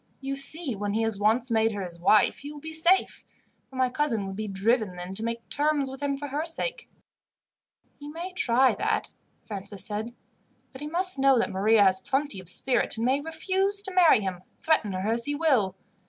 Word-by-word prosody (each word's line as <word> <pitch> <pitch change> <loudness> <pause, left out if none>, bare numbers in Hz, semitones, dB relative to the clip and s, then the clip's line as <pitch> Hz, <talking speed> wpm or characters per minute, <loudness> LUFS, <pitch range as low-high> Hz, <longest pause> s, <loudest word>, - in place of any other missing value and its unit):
"You 275 0 -4
see, 280 -1 -1
when 205 +1 -3
he 225 - +1
has 225 -3 -2
once 230 +4 +2
made 225 0 +2
her 200 -1 -4
his 170 -2 -8
wife 200 +4 +3
he 290 +1 -8
will 300 - -10
be 320 +2 -8
safe, 340 +4 +2 0.5
for 265 - -15
my 260 0 +2
cousin 245 -6 -1
would 195 0 -6
be 215 +1 -5
driven 205 0 0
then 180 +1 -7
to 215 +3 +1
make 230 0 -4
terms 290 -2 +1
with 265 - -10
him 280 -1 -1
for 290 +1 -6
her 290 +3 -2
sake." 480 +9 -2 1.1
"He 290 - -10
may 340 +5 -7
try 255 -6 +3
that," 435 - -2 0.3
Francis 200 -1 -7
said; 220 +3 -5 0.6
"but 260 - -12
he 295 - -5
must 355 0 +1
know 270 -1 +4
that 230 - 0
Maria 205 +3 +3
has 190 -1 +3
plenty 270 0 -2
of 180 -2 -4
spirit, 245 +5 +3
and 225 - -2
may 265 +3 +1
refuse 380 +6 -1
to 385 -2 0
marry 345 -11 +5
him, 185 -2 -4 0.2
threaten 305 - +1
her 185 +2 -3
as 230 +1 0
he 290 - -2
will. 260 - +1
255 Hz, 210 wpm, -26 LUFS, 210-300 Hz, 1.1 s, marry